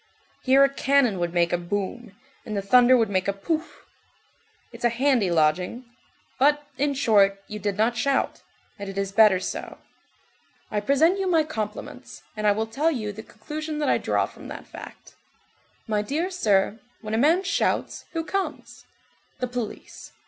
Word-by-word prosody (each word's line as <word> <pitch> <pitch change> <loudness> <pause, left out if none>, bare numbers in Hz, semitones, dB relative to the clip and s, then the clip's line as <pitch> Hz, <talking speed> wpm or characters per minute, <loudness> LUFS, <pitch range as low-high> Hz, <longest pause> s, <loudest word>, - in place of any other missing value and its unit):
Here 270 +1 +5
a - - +6
cannon 270 -8 +2
would 175 -1 -1
make 175 0 +1
a 175 - +1
boum, 205 +5 -4 0.3
and 210 -2 -5
the - - 0
thunder 250 +5 +6
would 225 -3 +1
make 185 0 0
a 200 - +1
pouf. 315 +12 -4 0.9
It's - - -12
a 240 - +4
handy 240 -4 +2
lodging. 175 +9 +1 0.5
But, 295 +2 +3
in 285 +1 0
short, 200 -7 +3
you 210 - -6
did 205 0 -2
not 225 +3 +2
shout, 270 +4 0 0.4
and 200 -1 -6
it 195 - -8
is 195 0 -1
better 200 -2 +5
so. 185 - -5 0.9
I 210 - 0
present 315 - +3
you 385 - -1
my 325 -3 +4
compliments, 215 -9 -6
and 215 -1 -1
I - - +6
will 220 +2 0
tell 275 +9 0
you 225 -9 -3
the 210 +2 -9
conclusion 300 +9 -6
that 300 - 0
I - - +3
draw - - +1
from - - -12
that - - -8
fact: - - -12 0.7
My 215 -2 0
dear 310 - -2
sir, 215 - +1 0.2
when 215 0 -5
a - - +2
man 325 +8 +4
shouts, 390 - -1
who 330 -1 -2
comes? 390 +4 -5 0.5
The - - -2
police. 245 -3 -7
225 Hz, 175 wpm, -25 LUFS, 200-280 Hz, 0.9 s, a